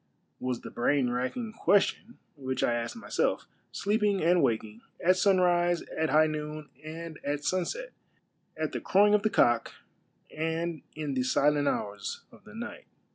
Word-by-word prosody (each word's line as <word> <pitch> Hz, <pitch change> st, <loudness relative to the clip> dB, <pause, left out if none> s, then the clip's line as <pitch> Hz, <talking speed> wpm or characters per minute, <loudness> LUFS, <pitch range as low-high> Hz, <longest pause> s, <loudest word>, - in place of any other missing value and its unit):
was 125 Hz, -2 st, -2 dB
the -, -, -9 dB
brain 125 Hz, +1 st, +1 dB
racking 175 Hz, -, -3 dB
ques 205 Hz, -3 st, +4 dB
tion 235 Hz, +3 st, -6 dB, 0.2 s
which 130 Hz, -2 st, -3 dB
I 120 Hz, -, +2 dB
asked 120 Hz, -, -3 dB
myself, 230 Hz, -, -1 dB, 0.3 s
sleeping 205 Hz, -1 st, +1 dB
and 175 Hz, +1 st, +4 dB
waking, 110 Hz, -1 st, -1 dB, 0.2 s
at 185 Hz, +2 st, +4 dB
sunrise, 175 Hz, -2 st, +3 dB
at 160 Hz, 0 st, 0 dB
Iiigh 155 Hz, +1 st, +4 dB
noon, 150 Hz, 0 st, -5 dB
and 160 Hz, 0 st, -7 dB
at 145 Hz, +1 st, -2 dB
sunset; 185 Hz, -, -1 dB, 0.7 s
at -, -, -2 dB
the -, -, -4 dB
crowing 205 Hz, +2 st, +4 dB
of 210 Hz, -, +4 dB
the 215 Hz, -, +1 dB
cock, 120 Hz, -, +2 dB, 0.6 s
and 160 Hz, +1 st, -2 dB
in 150 Hz, -2 st, -3 dB
the 130 Hz, -, 0 dB
silent 145 Hz, +3 st, +2 dB
hours 100 Hz, -5 st, -3 dB
of -, -, -18 dB
the 210 Hz, -1 st, -13 dB
night. 240 Hz, -, -7 dB
160 Hz, 160 wpm, -29 LUFS, 135-195 Hz, 0.7 s, ques